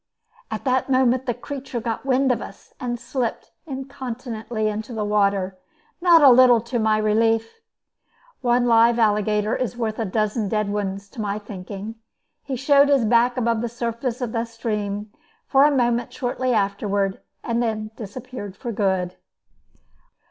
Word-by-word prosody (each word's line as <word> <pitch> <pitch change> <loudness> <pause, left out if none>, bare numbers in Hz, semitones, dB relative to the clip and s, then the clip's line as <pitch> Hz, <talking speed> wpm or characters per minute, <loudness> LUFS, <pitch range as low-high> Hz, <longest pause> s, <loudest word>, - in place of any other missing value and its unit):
At - - -5
that 260 +1 +1
moment 260 0 +2
the 240 - +1
creature 265 0 -6
got 230 +3 -4
wind 265 0 +3
of 235 -3 -1
us, 195 - -11
and 240 -1 -3
slipped 250 -2 -3 0.2
incontinently 250 -5 -4
into 215 +3 -4
the 215 -1 -1
water, 200 -2 +1 0.4
not 340 -3 +6
a 275 - +9
little 245 -1 +7
to 235 +2 -3
my 215 -1 +2
relief. 225 - +1 0.8
One 245 -1 +2
live 230 0 +5
alligator 210 -1 +2
is 250 -1 -3
worth 220 -2 -2
a 225 - 0
dozen 215 +1 -1
dead 210 -1 0
ones, 200 -1 -3
to 225 - -7
my 205 -1 -2
thinking. 205 +1 -8 0.4
He 270 - -4
showed 280 +2 +4
his 275 -5 +4
back 240 +3 +3
above 230 -2 +1
the 240 - -2
surface 235 +1 -3
of 240 -3 -2
the 230 0 -1
stream 210 -3 -4 0.3
for 275 +1 +5
a - - +6
moment 240 -3 +1
shortly 255 0 -2
afterward, 200 -2 0 0.2
and 235 0 0
then 215 -2 -2
disappeared 215 -2 -8
for 240 - -5
good. 190 -4 -1
230 Hz, 155 wpm, -23 LUFS, 210-250 Hz, 0.8 s, a